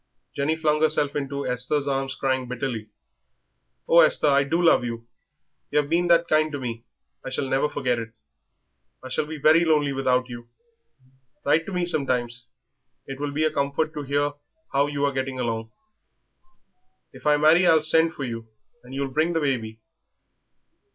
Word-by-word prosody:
Jenny 145 +3 0
flung 155 -1 0
herself 150 -2 +1
into 140 -1 -3
Esther's 125 +4 -1
arms 135 -1 -2
crying 130 -2 -1
bitterly. 120 -3 -4 1.0
"Oh, 170 - +6
Esther, 155 -2 +4
I 140 0 +4
do 160 +5 -1
love 170 -7 +4
you; 115 -1 -5 0.6
yer - - -1
'ave 145 - -9
been 175 +2 +1
that 170 0 +4
kind 155 0 +2
to 145 - -3
me 115 -2 -6 0.4
I - - -5
shall 135 - -2
never 135 +3 +1
forget 125 -5 -1
it. 115 0 -7 0.9
I 130 - -8
shall 150 - -1
be 160 0 -6
very 155 +3 +5
lonely 150 -4 +2
without 130 -1 +1
you. 120 -1 -10 1.0
Write 165 +1 +2
to - - -5
me 180 -1 -1
sometimes; 125 -6 -2 0.6
it 135 0 -8
will 145 0 -2
be 150 +2 -1
a 155 - +1
comfort 140 +3 -1
to 150 - -5
hear 145 +1 0 0.4
how 140 +1 +3
you 145 -1 -1
are 140 - 0
getting 130 -1 -3
on. 115 -2 -3 1.4
If - - -7
I 150 0 +5
marry 160 +4 +5
I'll 160 -1 +5
send 160 +1 +3
for 140 - -5
you, 115 -3 -5 0.4
and 125 +2 -10
you'll 135 -1 -3
bring 160 +4 +1
the 165 - +1
baby." 115 -7 -2
140 Hz, 175 wpm, -24 LUFS, 125-155 Hz, 1.4 s, Oh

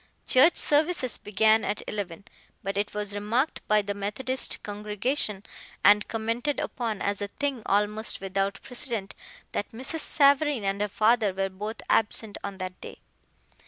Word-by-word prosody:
Church 290 +7 +5
services 295 -4 +2
began 220 +2 +3
at 205 +1 -2
eleven, 200 -4 -4 0.4
but 195 +1 -3
it 205 +1 -1
was 205 -1 -3
remarked 225 +8 0
by 215 -1 +4
the 200 0 -3
Methodist 215 +6 -2
congregation, 210 +1 0 0.4
and 205 0 +6
commented 230 +6 -1
upon 225 -5 -3
as 200 0 -1
a 205 - -1
thing 275 +3 -3
almost 210 +2 0
without 195 +1 -2
precedent, 240 -6 -3 0.4
that 205 - -3
Mrs. 260 +8 -4
Savareen 285 -4 +4
and 195 +1 -1
her 210 - +1
father 215 +1 +3
were 195 0 0
both 210 +4 -6
absent 220 -1 +1
on 200 -1 -5
that 185 -1 -6
day. - - -9
210 Hz, 150 wpm, -27 LUFS, 200-250 Hz, 0.4 s, and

